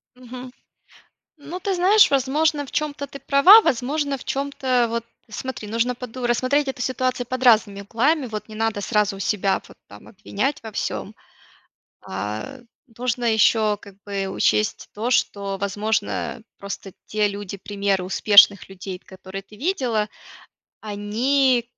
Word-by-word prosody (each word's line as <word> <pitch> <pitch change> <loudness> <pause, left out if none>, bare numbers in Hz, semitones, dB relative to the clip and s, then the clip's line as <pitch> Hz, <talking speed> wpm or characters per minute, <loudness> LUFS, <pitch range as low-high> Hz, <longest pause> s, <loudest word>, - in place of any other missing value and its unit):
Мгм. 250 0 -10 0.9
Ну, 305 +4 -7
ты 390 +1 -1
знаешь 380 +3 +5
возможно 290 +3 +1
в 270 - -12
чём-то 295 -2 -2
ты 275 - -10
права, 330 +11 +8
возможно 280 - 0
в - - -12
чём-то, 265 -3 0
вот 230 0 -3 0.2
смотри 220 0 -6
нужно 230 +3 0
поду 250 0 -5
рассмотреть 255 +4 +1
эту 265 - -5
ситуацию 255 -1 -1
под 255 +1 -4
разными 220 -5 +4
углами. 265 +8 +1
Вот 215 -2 -6
не 215 - -10
надо 225 -1 -1
сразу 210 0 0
у - - -10
себя 195 -1 0
вот - - -16
там 100 +1 -14
обвинять 230 +6 -3
во 225 - -7
всём. - - -4 0.9
А, 105 - -5 0.4
нужно 245 0 -1
ещё 215 -1 +3
как 200 -1 -14
бы 200 -1 -2
учесть 210 +2 0
то, 225 +4 -2
что 200 -5 0
возможно, 205 +2 -1 0.3
э, - - -18 0.2
просто 200 0 -7 0.2
те 210 -1 +1
люди 200 -1 -6
примеры 200 -1 -1
успешных 200 +1 +5
людей, 185 -1 -7
которые 190 +1 -8
ты 210 +2 -17
видела, 240 - 0 0.7
они 235 +5 +1
230 Hz, 145 wpm, -22 LUFS, 205-265 Hz, 0.9 s, права